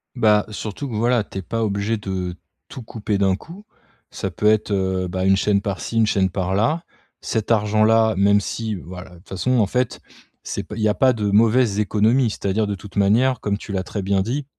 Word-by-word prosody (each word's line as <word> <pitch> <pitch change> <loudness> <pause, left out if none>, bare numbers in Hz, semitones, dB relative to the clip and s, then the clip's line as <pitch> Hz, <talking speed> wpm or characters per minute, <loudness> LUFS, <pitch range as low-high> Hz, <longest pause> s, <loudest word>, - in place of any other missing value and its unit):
Bah, 105 -4 +3
surtout 110 +6 -5
que 115 - -5
voilà, 120 0 +2
tu 95 - -7
es - - -4
pas 115 +6 -3
obligé 105 +1 -1
de 95 -3 -4 0.3
tout 130 - -8
couper 110 -2 -3
d'un 95 -1 +2
coup. 175 - -12 0.5
Ça - - -4
peut - - -5
être, 105 0 +3
heu, 95 -1 0
bah, 95 +1 -2
1 95 0 +5
chaîne 100 0 +1
par 100 -3 -4
ci 115 - -4
1 115 - +5
chaîne 95 -2 +2
par 95 0 -2
là. 155 - +1 0.4
Cet 110 0 -2
argent-là, 110 +1 +3
même 100 +1 +4
si 110 +2 -4
voilà, 90 0 -9
de - - -14
toute 85 - -22
façon, 125 +6 0
en 105 - +4
fait, 125 +5 -1 0.4
c'est - - -4
p - - -9
il - - -3
y 110 - +3
a 105 - +2
pas 130 +3 +3
de 110 -3 -3
mauvaises 110 +1 +3
économies. 110 +5 +2
C'est-à-dire 105 +1 -1
de 100 - -2
toute 100 +1 -13
manière, 115 +5 +3
comme 100 -1 -1
tu 105 - -9
l'as 95 -1 -1
très 100 +2 -5
bien 95 0 +1
dit, 130 +7 -2
105 Hz, 225 wpm, -21 LUFS, 95-115 Hz, 0.5 s, 1